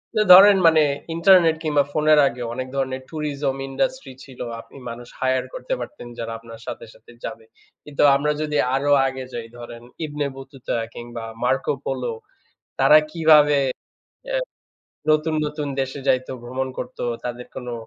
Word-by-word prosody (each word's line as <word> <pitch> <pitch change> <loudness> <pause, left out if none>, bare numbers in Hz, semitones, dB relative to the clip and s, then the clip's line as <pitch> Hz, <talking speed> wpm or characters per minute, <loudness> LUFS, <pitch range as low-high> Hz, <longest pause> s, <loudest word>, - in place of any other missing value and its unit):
তো 215 - +3
ধরেন 195 +1 +9
মানে 160 -1 +5 0.3
ইন্টারনেট 170 -2 +5
কিংবা 145 -2 +2
ফোনের 155 -1 +4
আগেও 120 -2 -4
অনেক 130 0 -4
ধরনের 130 -1 -2
tourism 145 -3 -2
industry 260 - -2
ছিল। 130 -3 -15 0.2
আপনি - - -17
মানুষ 120 +1 -8
hire 130 0 +1
করতে - - -4
পারতেন 300 - -8
যারা 115 0 -4
আপনার 115 0 -12
সাথে, - - -6
সাথে - - -19
যাবে। 110 0 -7 0.4
কিন্তু 145 -1 -4
আমরা 150 +2 +1
যদি 150 -1 -1 0.2
আরও 145 +1 0 0.2
আগে 130 0 -5
যাই 115 -1 -5
ধরেন 120 0 -10 0.2
ইবনে 145 -1 -3
বতুতা 135 -2 -6 0.2
কিংবা 120 -1 -8 0.2
মার্কো 130 +3 +1
পোলো 125 -3 -2 0.7
তারা 155 - +7
কীভাবে 150 -3 +5 0.8
এ - - +1 0.8
নতুন, 155 +1 +2
নতুন 150 0 -4
দেশে 135 +1 -4
যাইতো, 130 +1 +1
ভ্রমণ 130 +2 -3
করতো 125 - -6 0.2
তাদের 125 0 -5
কোনো 125 -1 -6
135 Hz, 150 wpm, -22 LUFS, 125-155 Hz, 0.8 s, ধরেন